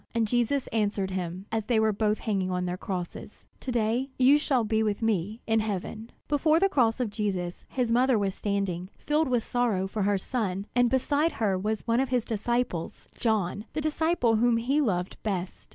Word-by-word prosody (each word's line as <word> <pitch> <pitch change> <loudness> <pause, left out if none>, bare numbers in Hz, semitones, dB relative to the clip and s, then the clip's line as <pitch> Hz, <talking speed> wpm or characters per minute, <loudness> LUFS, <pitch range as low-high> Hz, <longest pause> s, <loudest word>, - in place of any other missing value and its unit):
And 225 -1 +2
Jesus 245 +4 +1
answered 205 -3 0
him, 185 0 -4
as 220 -1 -1
they 230 -1 +2
were 220 -1 +3
both 210 +1 0
hanging 195 -4 -1
on 180 0 -1
their 180 0 -2
crosses: 180 -1 -6
"To 260 - -4
day 240 +3 0
you 270 +3 +6
shall 265 -5 +1
be 220 0 +1
with 215 0 -1
me 215 0 0
in 225 0 +2
heaven." 215 +2 -4 0.2
Before 305 +2 +3
the 390 +2 +3
cross 240 -7 +2
of 240 -4 -1
Jesus 190 -5 -3
his 245 -3 -1
mother 250 +1 +4
was 200 -2 0
standing, 195 -3 -2
filled 300 +1 +1
with 245 -3 +1
sorrow 230 -6 0
for 205 +2 -3
her 200 0 +2
son, 195 -3 -2
and 245 -1 +4
beside 285 +5 +1
her 205 -4 0
was 210 +3 -2
one 230 +1 +2
of 265 -1 +1
his 250 -3 +1
disciples, 230 -5 -2
John, 210 -3 0
the 310 - -2
disciple 310 -6 +1
whom 235 +1 +3
he 265 +6 +1
loved 185 -8 -1
best. 190 -4 -4
220 Hz, 195 wpm, -27 LUFS, 195-245 Hz, 0.2 s, you